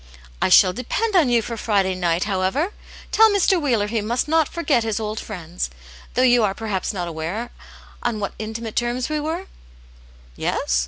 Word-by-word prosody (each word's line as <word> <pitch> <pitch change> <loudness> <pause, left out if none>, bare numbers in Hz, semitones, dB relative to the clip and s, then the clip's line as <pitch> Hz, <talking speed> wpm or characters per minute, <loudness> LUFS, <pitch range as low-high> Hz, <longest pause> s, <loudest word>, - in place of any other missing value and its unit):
I - - +3
shall 185 - +7
depend 405 - -2
on 320 -8 +5
you 235 -2 +3
for 230 - -4
Friday 200 -4 +1
night, 175 -1 0
however. 205 - 0 0.4
Tell 445 0 +6
Mr. 390 -3 +3
Wheeler 235 -8 +1
he 215 +1 -1
must 235 +6 -1
not 320 -1 +2
forget 305 -8 +1
his 225 -1 -1
old 215 0 -3
friends. 175 -4 -5 0.5
Though 255 - +3
you 245 -2 +5
are 195 -2 +1
perhaps 210 -4 -2
not 180 -4 -4
aware 170 +8 -4 0.5
on 235 -3 -1
what 200 - -3
intimate 220 +1 -5
terms 240 +2 -1
we 305 0 -1
were? 325 +5 -3 0.9
Yes? - - 0
225 Hz, 175 wpm, -22 LUFS, 195-275 Hz, 0.9 s, shall